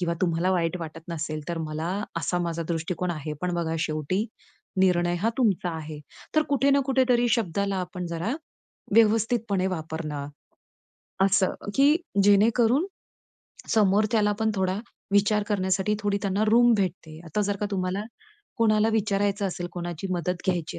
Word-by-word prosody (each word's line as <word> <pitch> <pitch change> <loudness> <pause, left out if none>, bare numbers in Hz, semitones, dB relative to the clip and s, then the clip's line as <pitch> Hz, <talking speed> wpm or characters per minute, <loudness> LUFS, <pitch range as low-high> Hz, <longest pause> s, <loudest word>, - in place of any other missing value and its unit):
किंवा 170 -1 0
तुम्हाला 170 +1 +1
वाईट 170 -1 0
वाटत 160 0 -7
नसेल, 155 -2 -3
तर 170 -1 -2
मला 155 +1 -3 0.3
असा 170 +2 0
माझा 170 -1 -2
दृष्टिकोन 175 +2 -2
आहे, 155 -1 -5
पण 180 -1 -1
बघा 165 -1 -1
शेवटी 160 +7 -1 0.5
निर्णय 175 -2 +3
हा 225 - +3
तुमचा 195 -7 +2
आहे. 155 -1 -7 0.4
तर 310 - +6
कुठे 280 0 +3
ना 280 - +4
कुठेतरी 250 -3 +3
शब्दाला 200 -3 0
आपण 180 -1 -4
जरा 170 +9 -2 0.6
व्यवस्थितपणे 225 -3 +3
वापरणं. 160 -4 -4 1.0
असं 195 -1 +3 0.2
की 285 +3 +5 0.3
जेणेकरून 230 - +4 0.9
समोरच्याला 210 +1 +3
पण 220 - +2
थोडा 190 0 0 0.3
विचार 205 +1 +3
करण्यासाठी 190 0 +1
थोडी 205 -1 0
त्यांना 200 +1 0
रूम 240 +2 +6
भेटते. 170 -5 -3
आता 165 +6 -2
जर 205 0 -1
का 210 - -2
तुम्हाला 185 +1 -1 0.6
कोणाला 215 -1 +3
विचारायचं 205 -1 +1
असेल, 175 -1 -4
कोणाची 175 +1 -5
मदत 180 +1 -2
घ्यायची 175 -4 -1
190 Hz, 140 wpm, -26 LUFS, 170-215 Hz, 1.0 s, तर